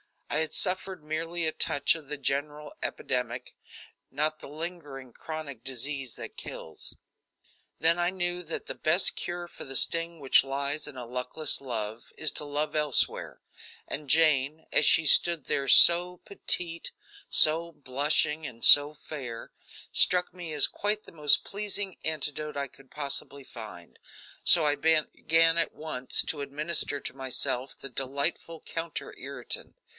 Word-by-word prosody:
I - - 0
had 160 0 -2
suffered 185 -2 0
merely 165 +2 -3
a 160 - +1
touch 145 -2 +1
of 160 -3 -10
the 150 +1 -6
general 145 +2 -3
epidemic, 125 -1 -4 0.6
not 155 +3 -2
the - - -10
lingering, 145 -4 -8
chronic 145 -5 -8
disease 135 0 -5
that - - -10
kills. 80 - -8 0.8
Then 165 +2 +3
I 175 0 +1
knew 175 -1 -3
that 165 -1 -5
the - - -6
best 165 +5 +2
cure 175 0 -4
for - - -11
the 135 - -6
sting 165 +3 +3
which 135 -2 +4
lies 140 +2 -3
in 150 - -8
a 125 -1 -7
luckless 125 +6 -1
love 115 -3 -6
is 155 - 0
to 150 - -3
love 145 +2 -3
elsewhere, 150 -3 +1 0.5
and 145 -1 -6
Jane, 155 -1 +2
as 150 - +3
she 160 - +4
stood 165 0 +4
there, 140 -1 -2
so 175 +5 +7
petite, 170 -4 0 0.4
so 165 +2 +6
blushing 150 +2 -1
and 115 -1 -11
so 145 +1 +8
fair, 130 -7 -8 0.4
struck 180 0 +3
me 175 -3 -8
as 150 - +7
quite 210 +1 -3
the - - -14
most 150 -3 +3
pleasing 200 -2 -2
antidote 150 -1 -3
I 140 0 -2
could 135 0 -18
possibly 140 -1 -5
find, 110 -9 -12 0.5
so 165 -3 +6
I 145 -1 +2
began 160 +1 +2
at 165 -2 +2
once 130 -5 0
to 150 - -3
administer 145 +1 -1
to - - -5
myself 130 0 -2
the 135 - -8
delightful 140 +5 -3
counter 165 0 -6
irritant. - - -7
150 Hz, 150 wpm, -28 LUFS, 135-165 Hz, 0.8 s, so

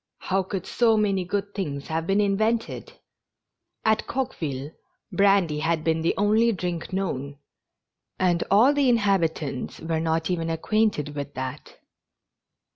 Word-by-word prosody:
How 190 +1 0
could 190 0 -5
so 225 -2 +3
many 200 -3 +1
good 200 +3 -3
things 145 -8 -4
have 160 +1 -2
been 195 +1 +2
invented! 215 +3 0 0.9
At 220 0 +2
Coqueville 150 - -3 0.4
brandy 195 -6 +3
had 160 0 0
been 160 0 +1
the 165 - +1
only 215 +3 +3
drink 175 -3 -4
known, 145 -7 -3 0.8
and 175 -2 +2
all 230 +8 +6
the 285 -3 +3
inhabitants 170 - 0
were 165 -1 -2
not 160 +1 0
even 165 -2 -1
acquainted 165 -3 0
with 145 0 -5
that. 130 -1 -6
180 Hz, 130 wpm, -25 LUFS, 160-205 Hz, 0.9 s, all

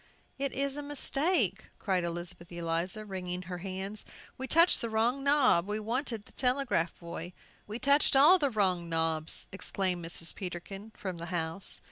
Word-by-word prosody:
"It 275 -1 -1
is 275 +1 -1
a - - -3
mistake," 285 - +1
cried 185 -4 0
Elizabeth 170 0 -6
Eliza, 170 +4 -2
wringing 180 -2 -4
her 180 0 -6
hands. 195 +3 -4 0.3
"We 265 - -5
touched 335 +5 +5
the 230 - -2
wrong 235 +5 +1
knob; 275 -11 +4
we 210 +1 -2
wanted 230 0 -3
the - - -16
telegraph 250 -10 +1
boy!" 170 +1 -7 0.3
"We 210 +2 -5
touched 280 +3 +3
all 310 +8 +7
the 285 -3 +2
wrong 185 -7 0
knobs," 160 -1 +2
exclaimed 185 -2 -2
Mrs. 165 0 +1
Peterkin, 195 +3 -7
from 185 -3 -5
the 170 - -6
house. 170 +1 0
195 Hz, 160 wpm, -30 LUFS, 175-260 Hz, 0.3 s, all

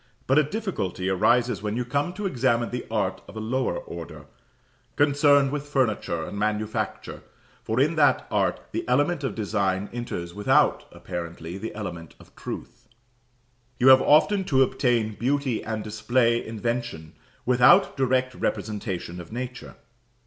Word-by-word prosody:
But 135 +3 +4
a - - +4
difficulty 150 - -3
arises 120 +6 +2
when 105 +1 -2
you 125 - -1
come 140 +7 -1
to 205 +2 -5
examine 120 -7 +1
the 125 - -5
art 95 -4 -1
of - - -12
a - - -4
lower 130 - -1
order, - - -9 0.7
concerned 145 -1 +4
with 145 0 -4
furniture 110 - 0
and 100 - -6
manufacture, 110 +1 -2 0.4
for 110 +3 -2
in 150 +5 +3
that 145 -2 +3
art - - +1
the - - -2
element 145 +4 +2
of 135 - -2
design 100 -2 -1
enters 85 -8 -5
without, 105 +1 +2
apparently, 85 0 -7
the 110 +1 -6
element 85 -6 -7
of - - -19
truth. - - -8 0.9
You 125 +2 +5
have 130 0 +8
often 190 +7 +4
to 135 -7 +4
obtain 120 -4 0
beauty 130 +1 -1
and 110 -1 -4
display 115 +2 +1
invention 115 -8 -4 0.3
without 125 0 +5
direct 130 -1 +1
representation 95 -7 -3
of 85 - -13
nature. 125 +2 -6
120 Hz, 145 wpm, -25 LUFS, 105-135 Hz, 0.9 s, have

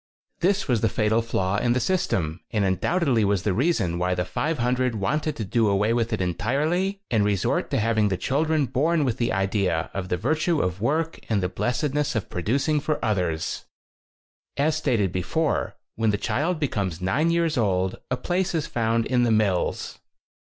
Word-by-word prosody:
13 175 - +3
This 200 -1 0
was 120 -5 +1
the 110 - +2
fatal 110 +2 +1
flaw 100 -4 -1
in 120 +1 +2
the 125 - +1
system 115 - 0
and 105 -2 0
undoubtedly 125 - +1
was 100 -3 +1
the 105 - +1
reason 100 - +1
why 90 +1 +1
the 90 0 -1
500 125 - 0
wanted 150 +9 -1
to 110 - -4
do 115 +3 +2
away 105 +3 +2
with 115 -1 0
it 110 - -1
en 90 -1 0
tirely 160 - 0
and 110 -3 +3
resort 100 -3 0
to - - 0
having 110 -1 +2
the 95 -2 -1
chil 135 - 0
dren 155 -2 +1
born 155 +4 +1
with 120 -4 -1
the 120 - 0
idea 95 -3 0
of 95 -1 -4
the 90 - 0
virtue 155 - +1
of 90 +1 -2
work 160 +7 0
and 105 -4 +1
the 90 - 0
blessedness 140 +8 -1
of 110 - -3
pro 90 - -3
ducing 140 - +1
for 155 +1 -1
others. 90 -7 -1 0.9
As 150 +2 +2
stated 110 - +1
before, 145 - -1 0.2
when 110 0 0
the 105 - +1
child 155 - -1
becomes 100 - -2
nine 130 - +1
years 170 -1 +1
old, 95 -6 0
a 125 - 0
place 180 +3 -1
is 155 -2 0
found 115 -5 0
in 125 -2 +1
the 120 - +3
mills. 105 -5 0
115 Hz, 195 wpm, -24 LUFS, 95-150 Hz, 0.9 s, 13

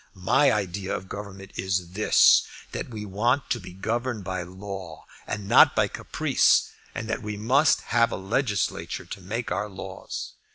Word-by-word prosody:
My 110 +10 +3
idea 95 -2 -2
of 95 - -6
government 100 0 -8
is 90 -2 -1
this, 105 +4 +6 0.3
that - - -5
we 110 -3 -6
want 120 +8 0
to 120 - +1
be 90 - -10
governed 110 +4 -2
by 95 0 -3
law 95 -2 -8 0.2
and 105 -1 -4
not - - +7
by - - +3
caprice, - - +2 0.2
and 110 - -4
that 110 - -2
we 105 -1 -5
must 135 +7 +3
have 115 0 +2
a - - -2
legislature 105 +2 -1
to 95 - -8
make 110 +6 -4
our 100 +3 -1
laws. 95 0 -7
100 Hz, 165 wpm, -26 LUFS, 95-115 Hz, 0.3 s, not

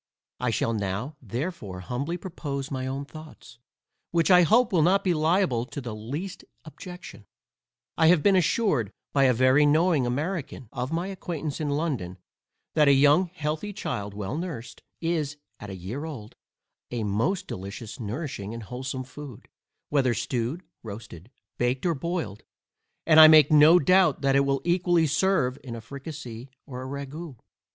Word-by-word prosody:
I 125 - 0
shall 115 +1 0
now 105 +7 -3
therefore 120 - -5
humbly 140 - -3
propose 145 -7 -5
my 130 -1 -3
own 135 +2 -4
thoughts, 155 -5 -13 0.5
which 170 +2 +2
I 180 0 +8
hope 220 +6 +4
will 170 - +4
not 185 +5 +3
be 180 - +2
liable 155 -6 +2
to 145 - -6
the 120 -5 -6
least 140 - -6 0.2
objection. 160 - -11 0.7
I 160 - +6
have 165 -2 +5
been 200 -1 +5
assured 170 - +1 0.2
by 140 -1 +4
a 130 - +5
very 130 +4 +4
knowing 155 -2 +3
American 140 - -3
of 125 +3 -4
my 170 +2 -1
acquaintance 165 -5 -5
in 150 - -1
London, 140 - -2 0.6
that 150 -2 +4
a 140 - +7
young 145 +6 +5
healthy 160 +4 -4
child 100 - -4
well 105 +4 -4
nursed, 160 -8 -6 0.2
is, 155 -4 -1 0.2
at 105 - -8
a 95 - -6
year 100 - -6
old, 125 -10 -8 0.5
a 120 -2 -3
most 115 - 0
delicious 100 +5 -7
nourishing 115 -2 -5
and 115 - -7
wholesome 130 +3 -5
food, 130 -1 -11 0.4
whether 130 -5 +2
stewed, 125 - -2 0.2
roasted, 105 -3 -10 0.3
baked, 125 +4 0
or 170 - +2
boiled; 165 - -4 0.6
and 160 -1 +6
I 155 - +12
make 155 -2 +7
no 155 +3 +8
doubt 185 +3 +4
that 135 -1 +2
it 140 0 +4
will 135 -1 +1
equally 175 -1 +2
serve 150 -3 +1
in 120 -3 -6
a - - -6
fricasee, 135 -1 -8 0.2
or 125 -4 -7
a 130 - -6
ragoust. 140 +1 -7
140 Hz, 160 wpm, -26 LUFS, 120-165 Hz, 0.7 s, I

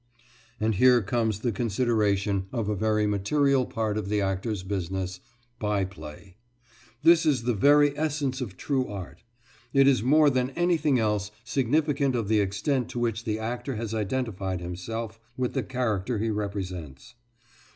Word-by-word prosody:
And 110 +1 +1
here 125 +3 +5
comes 110 0 -1
the 120 - 0
consideration 105 -5 0
of 115 -5 -2
a 105 - 0
very 105 +1 +1
material 130 +6 +2
part 110 -1 -1
of 100 -2 -5
the 105 0 +1
actor's 95 +1 -2
business 95 -1 -3 0.4
by 105 -2 0
play. 90 +1 -11 0.7
This 165 0 +6
is 140 -6 +2
of - - -11
the 120 - +2
very 145 +6 +4
essence 145 -3 -1
of 100 -7 -6
true 130 +2 -1
art. 100 -4 -8 0.5
It 135 0 +6
is 130 -6 +4
more 145 +4 +5
than 130 0 0
anything 165 -5 +2
else 105 -3 0
significant 140 +2 +1
of 115 -4 -2
the 110 -1 +4
extent 105 +6 0
to 120 - -4
which 115 -1 -1
the 110 -2 -1
actor 120 +4 -4
has 110 0 -4
identified 105 -4 -2
himself 105 +6 -5 0.2
with 125 -1 -1
the - - 0
character 120 -3 -1
he 110 +2 -1
represents. 95 - -5
110 Hz, 160 wpm, -27 LUFS, 100-130 Hz, 0.7 s, This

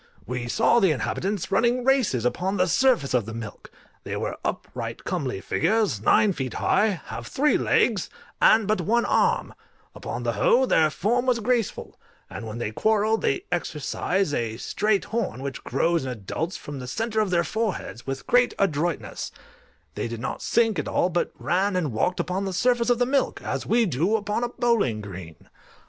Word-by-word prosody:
We 120 -1 -4
saw 225 - +3
the 195 - +4
inhabitants 180 - -2
running 240 +1 +2
races 250 - +2
upon 185 +10 0
the 185 - +3
surface 240 - +2
of 120 -4 +1
the 115 - -6
milk: 115 -2 -8 0.3
they - - -4
were - - -3
upright, 115 -2 -4
comely 135 - -3
figures, 200 - +1
nine 200 - +4
feet 130 -6 -4
high, 205 -5 +2
have - - -7
three 295 +3 +2
legs, - - +2 0.3
and 220 -2 +5
but 215 -3 +1
one 235 +7 +2
arm; - - +1 0.4
upon 120 +1 -5
the 120 - +1
whole, 245 - +3
their 160 -10 +3
form 240 +10 0
was 245 -2 +3
graceful, 235 -1 -1 0.3
and 115 - -6
when 110 +1 -6
they 120 -3 -3
quarrel, 215 - +2
they 140 - -1
exercise 175 +1 -1
a 115 -3 -2
straight 210 - 0
horn, 210 - -3
which 140 -3 -5
grows 165 +4 +1
in 130 - -3
adults 125 - -4
from 145 -2 -8
the 125 - -7
centre 220 - -2
of 215 -2 +1
their 175 -1 +2
foreheads, 200 - -3
with 135 0 -4
great 245 0 +3
adroitness; 170 -3 -1 0.6
they - - -3
did 115 -1 -6
not 125 - -4
sink 225 -6 +2
at - - -3
all, 180 - +1
but 175 -1 -1
ran 185 +4 0
and 165 -7 0
walked 175 +11 0
upon 190 +2 -1
the 190 - -3
surface 240 +4 +2
of 245 - +4
the 245 - +2
milk, 270 +2 0
as - - -3
we 235 0 +3
do 175 - +1
upon 210 +2 -1
a 240 - -1
bowling 230 - +1
green. 95 -6 -10
180 Hz, 185 wpm, -25 LUFS, -, 0.6 s, and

